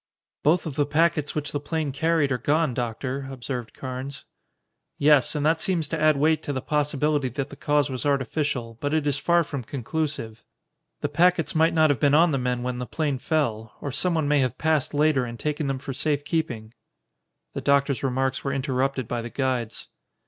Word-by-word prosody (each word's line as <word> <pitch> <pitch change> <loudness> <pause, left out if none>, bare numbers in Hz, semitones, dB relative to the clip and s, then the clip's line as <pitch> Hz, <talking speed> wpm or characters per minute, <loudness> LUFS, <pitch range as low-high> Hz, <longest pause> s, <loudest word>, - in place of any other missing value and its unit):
"Both 160 +4 +3
of 155 -3 -5
the 145 -1 +2
packets 155 -1 +1
which 150 -1 -2
the 145 - -2
plane 150 0 -2
carried 160 0 +1
are 125 - 0
gone, 150 +2 +1
Doctor," 130 +3 -3
observed 125 -2 -5
Carnes. 130 +1 -6 0.7
"Yes, 145 -1 +4
and 150 0 0
that 160 +1 +2
seems 170 -5 +1
to 165 -2 -2
add 155 -2 +4
weight 155 +2 +3
to 145 - -4
the 135 - -2
possibility 150 0 0
that 140 +3 -4
the - - -8
cause 145 -1 +1
was 130 - -3
artificial, 135 -4 -1
but 145 +2 0
it 155 -2 +1
is 145 0 +1
far 170 +3 +3
from 140 -4 -5
conclusive. 140 -3 -4 0.6
The - - -1
packets 175 -1 +2
might 160 +1 +3
not 155 -2 +5
have 135 - -1
been 145 +3 +4
on 165 +2 +5
the 135 - 0
men 125 -1 -1
when 125 0 -3
the 125 - -4
plane 145 -5 -1
fell, 120 -7 -1
or 145 - -4
someone 160 +1 +1
may 145 0 +3
have 130 -2 0
passed 155 -3 0
later 150 -3 +3
and 120 -1 -6
taken 150 -1 -2
them 135 -1 -1
for 135 +1 -6
safekeeping." 145 -6 -2 0.8
The - - -4
doctor's 140 -1 +2
remarks 130 0 -1
were 140 - -1
interrupted 135 -2 -1
by 120 0 -2
the 120 - -6
guides. 125 -3 -2
145 Hz, 195 wpm, -25 LUFS, 130-155 Hz, 0.8 s, not